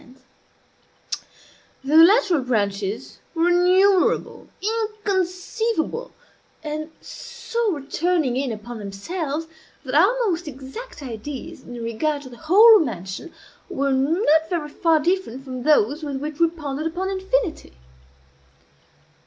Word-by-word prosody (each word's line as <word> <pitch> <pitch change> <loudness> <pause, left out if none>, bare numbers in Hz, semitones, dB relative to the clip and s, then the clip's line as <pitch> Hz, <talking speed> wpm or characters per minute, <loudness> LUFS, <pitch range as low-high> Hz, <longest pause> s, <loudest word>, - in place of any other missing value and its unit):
Then 295 +4 +5
the - - +10
lateral 370 - +5
branches 210 -2 -2 0.2
were 330 +1 +3
innumerable, 365 +2 +3
inconceivable, 425 0 -2 0.5
and 310 +1 -4
so 470 -2 -3
returning 310 -2 0
in 265 -1 -1
upon 225 +2 -7
themselves 285 - -4 0.4
that 260 - -5
our 355 +9 +6
most 350 -4 -1
exact 280 - -9
ideas 270 +6 -7
in 245 - -10
regard 285 +6 -1
to 260 - -10
the 240 - -12
whole 425 - +7
mansion 195 - -4 0.4
were 275 0 0
not 315 +4 +2
very 325 -4 -2
far 325 +1 +2
different 330 -6 -1
from 255 -2 -6
those 290 0 +3
with 285 -3 -3
which 300 +2 -5
we 335 -1 +5
pondered 305 -2 -4
upon 360 +4 -3
infinity. 380 - -1
315 Hz, 115 wpm, -23 LUFS, 265-370 Hz, 0.5 s, the